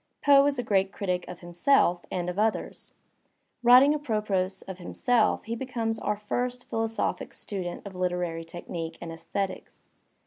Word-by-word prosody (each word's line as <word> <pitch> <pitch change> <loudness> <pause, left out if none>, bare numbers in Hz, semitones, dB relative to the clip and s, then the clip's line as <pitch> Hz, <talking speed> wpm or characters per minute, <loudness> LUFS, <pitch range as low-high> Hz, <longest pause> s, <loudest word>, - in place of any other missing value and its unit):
Poe 280 -1 +7
is 285 -2 0
a 245 - -1
great 195 -3 +2
critic 180 -3 -2
of 180 - -9
himself 175 0 +2
and 180 -1 -2
of 180 +2 -3
others. 220 0 -1 0.7
Writing 250 +4 +7
apropos 210 -10 0 0.2
of 190 -1 -7
himself 230 +5 +1
he 230 +1 -3
becomes 230 -3 -2
our 210 - -1
first 245 +4 -3
philosophic 225 0 -2
student 185 -4 -5
of 200 - -7
hterary 180 -2 -2
technique 165 0 -6
and 170 -1 -7
aesthetics. 185 +4 -5
200 Hz, 145 wpm, -27 LUFS, 180-240 Hz, 0.7 s, Poe